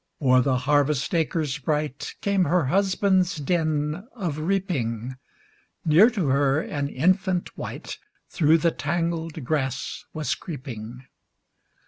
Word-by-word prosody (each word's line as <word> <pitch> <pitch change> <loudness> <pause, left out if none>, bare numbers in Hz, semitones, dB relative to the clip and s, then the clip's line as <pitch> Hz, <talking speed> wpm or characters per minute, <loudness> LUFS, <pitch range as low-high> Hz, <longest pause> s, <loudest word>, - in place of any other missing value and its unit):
O'er 130 -3 +4
the 130 0 +1
harvest 145 +2 +1
acres 160 -4 0
bright, 150 0 -2
Came 200 -2 +2
her 175 -3 +2
husband's 190 +2 +2
din 155 +3 -1
of 170 - -3
reaping; 140 - -2 0.7
Near 170 +9 +7
to 195 - -1
her, 140 +1 +3
an 145 -3 -3
infant 185 +5 +1
wight - - -7 0.3
Through 160 0 +3
the 170 +1 +2
tangled 165 0 -2
grass 135 -1 -2
was 155 -2 -1
creeping. 125 - -7
155 Hz, 115 wpm, -25 LUFS, 135-175 Hz, 0.7 s, Near